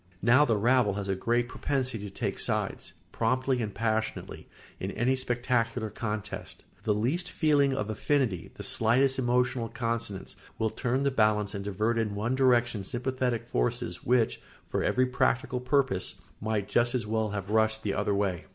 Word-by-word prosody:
Now 130 +6 +6
the 115 -5 +2
rabble 120 -2 +3
has 100 -1 -3
a 95 - +1
great 120 +5 +1
propensity 130 -3 -2
to 105 - -5
take 95 - -3
sides, - - -2 0.2
promptly 130 +2 +1
and 105 -2 -2
passionately, 110 +1 -2 0.3
in 95 - -3
any 120 +6 +1
spectacular 120 -3 -1
contest; 105 -2 -5 0.2
the 105 - +3
least 140 - -1
feeling 145 -4 +2
of 120 -6 -2
affinity, 110 - 0
the - - -7
slightest 130 +4 +3
emotional 125 -1 +1
consonance, 115 -5 -3 0.2
will 110 -1 0
turn 130 +1 -1
the 140 - +2
balance 105 -4 +2
and 100 -1 -4
divert 105 +4 0
in 105 -2 -1
one 110 +5 -1
direction 120 -5 +3
sympathetic 125 +1 -2
forces 120 -7 -1
which, 120 -2 +2 0.3
for - - -1
every 130 0 +3
practical 125 0 0
purpose, 125 -6 +1 0.2
might 105 -2 -1
just 120 +3 +2
as 120 - -1
well 110 0 0
have 100 -1 -4
rushed 110 0 +2
the 100 - 0
other 105 0 0
way. 95 -4 -1
115 Hz, 165 wpm, -29 LUFS, 105-130 Hz, 0.3 s, Now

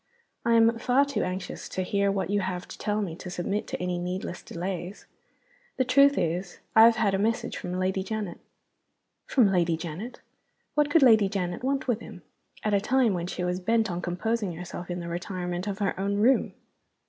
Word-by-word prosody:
"I 235 - +2
am 230 0 +4
far 255 +4 +3
too 280 - -2
anxious 185 0 -5
to 185 - -2
hear 200 +1 +1
what 195 -2 -2
you 205 - +2
have 185 -2 -3
to - - -9
tell 210 0 0
me 170 -5 -4
to 180 - -8
submit 195 +4 -2
to - - -4
any 180 -1 -2
needless 180 0 -4
delays. 180 +2 -5 0.7
The 260 - +2
truth 280 +2 +5
is, 175 +2 -1 0.2
I 220 0 +9
have 230 0 +6
had 210 -3 +1
a 195 - +1
message 225 +3 0
from 180 - -5
Lady 190 +1 0
Janet." 200 -2 -4 0.9
(From 230 -7 +4
Lady 170 -3 +2
Janet! 170 +9 -6 0.5
What 295 0 +2
could 320 -1 +5
Lady 220 -6 +6
Janet 180 0 -3
want 270 +1 -1
with 235 -3 +1
him, 190 -7 -11 0.4
at 210 - 0
a 200 - +3
time 250 -2 +3
when 175 -1 -2
she 180 - -4
was 180 +1 -1
bent 225 +2 +1
on 175 0 -3
composing 205 +2 -1
herself 175 +1 -7
in 175 0 -3
the 170 - -6
retirement 180 +1 -4
of 200 -1 -2
her 200 -2 0
own 200 +1 0
room?) 235 +6 +3
195 Hz, 200 wpm, -27 LUFS, 180-225 Hz, 0.9 s, I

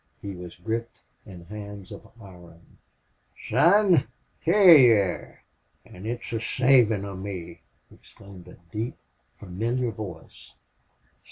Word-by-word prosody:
He 100 -1 -7
was 90 -1 -10
gripped 115 +6 -5 0.3
in 90 -4 -12
hands 100 0 -10
of - - -11
iron. 90 -5 -16 0.7
"Son! 175 - +4 0.4
hyar 180 0 +7
you 125 -5 +7
air 100 -3 -3 0.4
an' 95 +4 -11
it's 120 +1 -5
the 115 - -2
savin' 115 -3 +2
of 100 -2 -7
me!" 95 -3 -8 0.3
exclaimed 95 -3 -16
a 90 - -14 0.2
deep, 115 +3 -4 0.4
familiar 115 +6 -3
voice. 95 -7 -11
105 Hz, 115 wpm, -25 LUFS, 95-120 Hz, 0.7 s, hyar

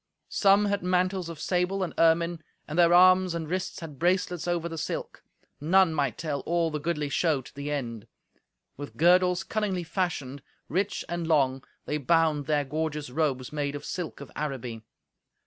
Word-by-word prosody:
Some 200 +1 +4
had 200 0 0
mantles 180 0 0
of 165 -3 -8
sable 185 +2 0
and 180 - -4
ermine, 165 0 +3 0.3
and 155 +3 -2
their 170 -1 +6
arms 185 0 +6
and 165 -2 -4
wrists 185 +2 -3
had 150 -5 -9
bracelets 180 -1 0
over 170 -1 0
the 165 - -6
silk; - - -5 0.4
none 175 +3 +4
might 140 -6 -1
tell 150 -3 -3
all 170 +2 0
the 150 - -3
goodly 150 -1 -2
show 145 -1 +1
to - - -14
the 140 +1 -5
end. 120 -7 -4 0.7
With 145 +1 -8
girdles 180 +2 +4
cunningly 195 -3 -2
fashioned, 160 -7 -3 0.3
rich 190 +6 -1
and 175 -1 -3
long, 135 -4 +2 0.2
they 150 - -2
bound 155 -1 +2
their 150 -2 +1
gorgeous 150 -1 -3
robes 135 -2 -1
made 145 -1 -2
of 145 - -7
silk 175 -5 -5
of 140 - -10
Araby. 125 -6 -4
165 Hz, 170 wpm, -27 LUFS, 145-180 Hz, 0.7 s, their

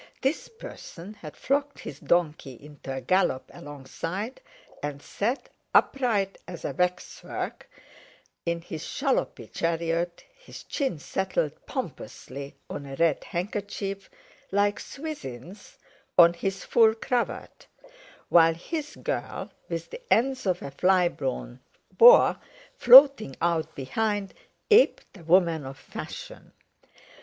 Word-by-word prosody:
This 270 +4 -1
person 210 - -10
had 170 -8 -11
flogged 285 +1 -1
his 145 - -8
donkey 155 -6 0
into 145 -2 -10
a 130 0 -4
gallop 130 -2 +1
alongside, 165 - -6 0.4
and 145 -1 -4
sat, 230 - -3 0.3
upright 220 -8 +2
as 175 - -8
a - - -1
waxwork, 180 0 -3 0.7
in 170 0 -2
his 160 -2 -7
shallopy - - -1
chariot, 170 +1 -1
his - - -12
chin 270 - -2
settled 185 0 -1 0.2
pompously 140 +2 -6
on 140 -1 -7
a 135 - -7
red 165 -1 +2
handkerchief, 195 +1 -4 0.4
like 205 +1 +2
Swithin's 205 - -8 0.4
on 170 -1 +8
his 195 +3 -3
full 220 -1 +5
cravat; 240 +2 -3 0.6
while 165 -1 +6
his 300 - -5
girl, - - -4 0.2
with - - -5
the 485 +1 -8
ends 260 -1 +2
of 185 +2 0
a 140 - -6
fly 180 +4 +3
blown 130 -3 -5 0.4
boa - - +7 0.3
floating 255 - +8
out 165 -2 0
behind, 205 +8 -2 0.4
aped 445 - +4
a 185 - -13
woman 165 -2 +3
of 135 0 -8
fashion. - - -9
180 Hz, 115 wpm, -26 LUFS, 155-220 Hz, 0.7 s, on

